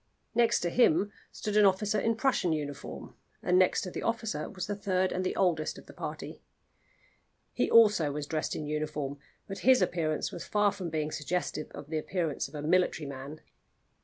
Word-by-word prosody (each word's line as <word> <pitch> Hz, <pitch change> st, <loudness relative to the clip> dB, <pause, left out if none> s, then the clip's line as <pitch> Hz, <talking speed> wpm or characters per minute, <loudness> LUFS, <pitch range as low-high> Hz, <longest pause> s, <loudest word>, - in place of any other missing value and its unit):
Next 235 Hz, -1 st, +3 dB
to 175 Hz, -, -1 dB
him 200 Hz, -3 st, +4 dB, 0.2 s
stood 210 Hz, -1 st, -4 dB
an 210 Hz, -1 st, +6 dB
officer 205 Hz, +2 st, +1 dB
in 225 Hz, +3 st, +1 dB
Prussian 225 Hz, -8 st, +1 dB
uniform, 145 Hz, -2 st, -6 dB, 0.3 s
and 180 Hz, +1 st, +4 dB
next 185 Hz, -, +3 dB
to 185 Hz, -, -5 dB
the -, -, -5 dB
officer 225 Hz, -9 st, -2 dB
was 185 Hz, -3 st, -5 dB
the 205 Hz, -, -3 dB
third 190 Hz, -2 st, 0 dB
and 185 Hz, -, -1 dB
the 185 Hz, -, -1 dB
oldest 165 Hz, -5 st, +1 dB
of -, -, -12 dB
the -, -, -13 dB
party. -, -, -6 dB, 1.1 s
He -, -, +1 dB
also 210 Hz, -10 st, +6 dB
was 145 Hz, +1 st, -4 dB
dressed 155 Hz, +1 st, -2 dB
in 155 Hz, -, -4 dB
uniform, 150 Hz, -2 st, -3 dB, 0.3 s
but 195 Hz, -, -6 dB
his 260 Hz, +1 st, +5 dB
appearance 155 Hz, -3 st, 0 dB
was 170 Hz, -, -6 dB
far 210 Hz, -1 st, +2 dB
from 185 Hz, -4 st, -5 dB
being 155 Hz, -1 st, -2 dB
suggestive 155 Hz, 0 st, -2 dB
of 145 Hz, 0 st, -9 dB
the 160 Hz, -, 0 dB
appearance 165 Hz, -2 st, -2 dB
of -, -, -13 dB
a 145 Hz, -, -5 dB
military 165 Hz, -2 st, +2 dB
man. 140 Hz, +3 st, -8 dB
175 Hz, 190 wpm, -30 LUFS, 150-205 Hz, 1.1 s, an